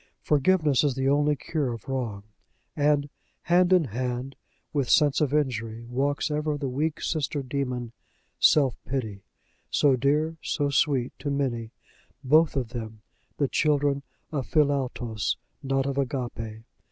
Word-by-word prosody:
Forgiveness 150 -1 +3
is 140 -4 +1
the 135 0 0
only 145 +1 +3
cure 145 -2 -2
of 115 -3 -8
wrong. 120 -7 -3 0.5
And 145 -1 +2 0.4
hand 180 +1 +3
in 180 -2 +6
hand 125 +2 -3 0.4
with 140 -5 0
Sense 150 -3 +4
of 145 -3 +2
injury 115 -6 -1
walks 140 +5 -1
ever 150 0 -1
the 140 -1 -3
weak 150 +5 -1
sister 145 -3 -1
demon 125 -3 -3 0.5
Self 135 -6 +5
pity, 110 -7 -4 0.5
so 140 -3 +4
dear, 150 +5 +1
so 145 -2 -1
sweet 135 -3 +1
to 145 +1 -3
many 130 -5 -1 0.5
both 155 +4 +4
of 125 -4 -1
them 110 -3 -7 0.3
the 140 - +2
children 145 -1 +1 0.3
of 140 -5 -2
Philautos, 130 -7 0 0.2
not 135 0 0
of 140 0 -1
Agape. 120 -5 -3
140 Hz, 140 wpm, -26 LUFS, 125-150 Hz, 0.5 s, in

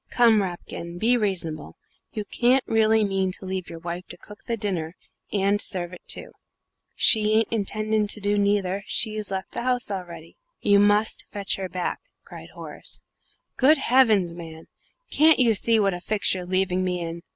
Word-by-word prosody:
"Come, 230 -3 +4
Rapkin, 175 -2 -6
be 230 +6 +2
reasonable. 170 - -3 0.4
You 210 -1 -5
can't 250 +4 +2
really 220 0 +3
mean 195 -2 0
to 190 - -6
leave 185 -1 -4
your 165 - -8
wife 175 +2 -6
to - - -11
cook 210 0 -15
the 230 - -2
dinner, 180 -6 -3 0.4
and 200 +1 +1
serve 180 -2 -2
it 180 - -11
too!" - - -2 0.6
"She 215 -1 +4
ain't 225 0 +2
intending 215 0 -1
to 210 - -2
do 205 0 0
neither; 200 -1 0
she've 215 -2 +1
left 190 -1 -4
the - - -5
house 245 -3 +1
already." 175 -4 -8 0.2
"You 200 0 +4
must 205 +2 +2
fetch 200 -2 -2
her 190 -1 -5
back," 180 -1 -3 0.3
cried - - -11
Horace. - - -6 0.5
"Good 295 +4 +5
heavens, 225 -10 +3
man, 165 -2 -10 0.5
can't 315 +1 +5
you 240 -3 +4
see 225 +2 +3
what 200 -2 +2
a 175 - -6
fix 210 +2 0
you're 180 -1 -5
leaving 185 0 0
me 180 -1 -2
in? 170 0 -6
200 Hz, 175 wpm, -24 LUFS, 180-220 Hz, 0.6 s, Good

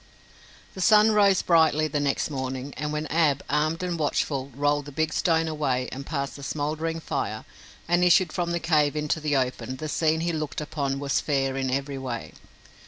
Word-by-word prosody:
The 190 - -6
sun 215 +2 +6
rose 200 -3 +4
brightly 160 -2 +4
the 150 - -2
next 145 +1 0
morning 130 0 -4
and 150 0 -3
when 150 0 -2
Ab, 150 -4 +2
armed 155 +4 0
and 175 -2 -2
watchful, 140 -2 -1
rolled 145 0 +1
the 145 - -9
big 160 +2 -1
stone 165 -2 +2
away 135 -5 -1
and 135 +2 -7
passed 140 -3 -3
the - - -10
smoldering 155 +3 -2
fire - - -3 0.4
and 175 +1 +3
issued 180 +1 +4
from 175 -2 -1
the 170 0 -1
cave 155 -3 +2
into 150 +1 -1
the 150 -2 0
open, 130 0 -1
the 155 +4 -5
scene 160 +1 +1
he 170 0 -1
looked 155 -2 -3
upon 140 -3 -2
was 140 -1 0
fair 135 -2 0
in 135 -1 -1
every 135 +1 -2
way. 125 -3 -5
150 Hz, 190 wpm, -26 LUFS, 140-165 Hz, 0.4 s, sun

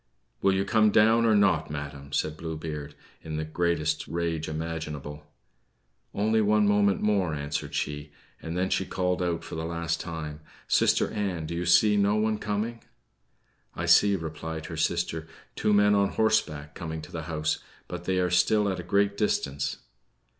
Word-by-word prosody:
"Will 95 -1 +3
you 95 +1 0
come 110 0 +4
down 115 +2 +4
or 110 - +4
not, 95 -6 +3
madam?" 70 -1 -7
said 75 +1 -1
Blue 80 0 -5
Beard, 75 -2 -6 0.3
in 80 -1 -5
the 80 - -2
greatest 80 -1 -1
rage 85 -2 -2
imaginable. 75 -2 -5 0.8
"Only 110 +2 +2
one 105 0 +3
moment 100 -1 +3
more," 100 -7 +1
answered 70 0 -4
she. 75 0 -3 0.3
And 80 +2 -5
then 95 +1 0
she - - +1
called 90 -1 -1
out 85 -2 -1
for - - -9
the 80 - -3
last 85 0 -2
time: 75 -3 -6 0.3
"Sister - - +3
Ann! 95 -6 -2
do 80 - -5
you 85 +1 -2
see 105 +4 +5
no 100 +1 +3
one 110 0 +1
coming?" 105 +3 -3 0.9
"I - - -3
see," 100 -1 +5
replied 80 -1 -5
her 80 - -6
sister, 80 -1 -1 0.3
"two - - +1
men 105 0 +5
on 100 -1 +3
horseback 75 -10 +1
coming 80 -1 -6
to - - -11
the 80 -2 -5
house; 75 -1 -1 0.3
but 90 0 -7
they 95 0 0
are 90 -1 +1
still 105 +4 +3
at 95 - -2
a - - -5
great 100 +2 +1
distance." 70 -9 -1
85 Hz, 175 wpm, -27 LUFS, 80-100 Hz, 0.9 s, see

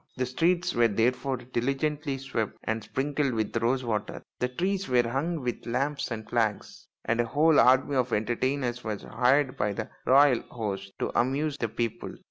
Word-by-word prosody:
The 130 - 0
streets 175 +7 +1
were 120 0 +4
therefore 125 +5 0
diligently 135 +4 -2
swept 130 -5 -3
and 110 0 -2
sprinkled 140 +1 -1
with 110 0 -2
rose 125 +3 +1
water, 105 -3 -3 0.2
the 125 - +1
trees 185 +7 -2
were 120 -2 +3
hung 150 +6 -2
with 120 -2 -4
lamps 135 +3 -1
and 110 -2 -5
flags, 110 -3 -2 0.2
and 115 +1 +2
a - - -1
whole 150 +5 +4
army 130 +2 +4
of 125 -1 +1
entertainers 120 +3 -1
was 105 -2 -4
hired 130 +1 +2
by 105 0 0
the 110 +1 -5 0.2
royal 135 -2 +6
host 100 -4 -4
to - - -2
amuse 140 +4 0
the 115 - -1
people. 115 0 -3
125 Hz, 170 wpm, -27 LUFS, 115-140 Hz, 0.2 s, royal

